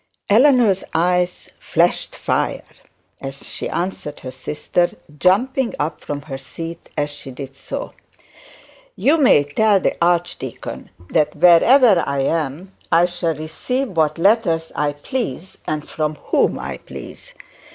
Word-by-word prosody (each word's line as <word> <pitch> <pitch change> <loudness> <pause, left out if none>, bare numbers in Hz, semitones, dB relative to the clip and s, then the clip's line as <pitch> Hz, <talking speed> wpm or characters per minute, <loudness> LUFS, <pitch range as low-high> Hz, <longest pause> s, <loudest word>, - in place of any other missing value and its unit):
Eleanor's 235 -4 +5
eyes 180 +2 +1
flashed - - +1
fire - - -1 0.6
as 135 0 -7
she - - -4
answered 175 -4 -4
her 130 - -6
sister, 150 +6 -1 0.3
jumping 245 +7 +2
up 150 +1 -3
from 145 -1 -5
her 135 -3 -6
seat 165 +5 -8
as 145 0 0
she 145 - -10
did 135 +1 -8
so. - - -6 1.0
'You 305 +4 +3
may 250 - +6
tell 200 +8 +3
the - - 0
archdeacon 175 0 -2 0.2
that 150 -1 +2
wherever 185 - +6
I 140 -1 0
am 160 +5 -2 0.2
I 170 +1 +5
shall 175 -2 -2
receive 240 - -3
what 160 -3 +1
letters 170 -4 +2
I 145 -1 0
please 185 - -5
and 155 -1 -3
from 155 -1 -2
whom - - +1
I - - -5
please. - - -11
165 Hz, 130 wpm, -20 LUFS, 150-195 Hz, 1.0 s, may